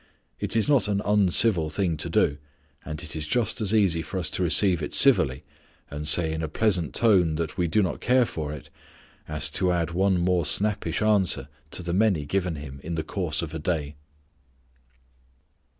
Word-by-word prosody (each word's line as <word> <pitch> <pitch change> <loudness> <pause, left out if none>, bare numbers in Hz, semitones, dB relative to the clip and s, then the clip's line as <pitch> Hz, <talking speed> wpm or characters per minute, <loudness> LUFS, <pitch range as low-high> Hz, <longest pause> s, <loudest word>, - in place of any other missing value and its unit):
It - - -3
is 110 - +2
not 140 -8 +3
an 100 -1 0
uncivil 100 -4 +3
thing 90 -1 -1
to - - -4
do, 70 +1 +1 0.4
and 75 -2 -6
it - - -5
is 75 -1 -4
just 120 +2 -1
as 105 -2 +1
easy 95 -7 +2
for 80 +4 -6
us 90 -3 -2
to - - -3
receive 90 +1 +3
it 75 - -4
civilly, 65 +2 +4 0.5
and 75 +1 -5
say 80 -1 +3
in 80 - -4
a 80 - -2
pleasant 90 -1 0
tone 95 -9 +3
that 80 0 -4
we 90 -2 0
do 100 +6 +2
not 90 - -3
care 125 0 +3
for 75 -8 -5
it, 75 0 -10 0.6
as 75 0 -1
to 90 +3 +1
add 85 -1 -1
one 95 +2 +1
more 90 0 +1
snappish 105 +7 0
answer 95 -10 +1 0.2
to 75 +5 -5
the 85 0 -3
many 95 -6 +1
given 90 +1 -2
him 70 -2 -9
in 85 +1 -4
the 80 - -2
course 85 -4 -2
of 80 - -7
a 80 - -4
day. 75 -2 -3
85 Hz, 195 wpm, -25 LUFS, 75-100 Hz, 0.6 s, civilly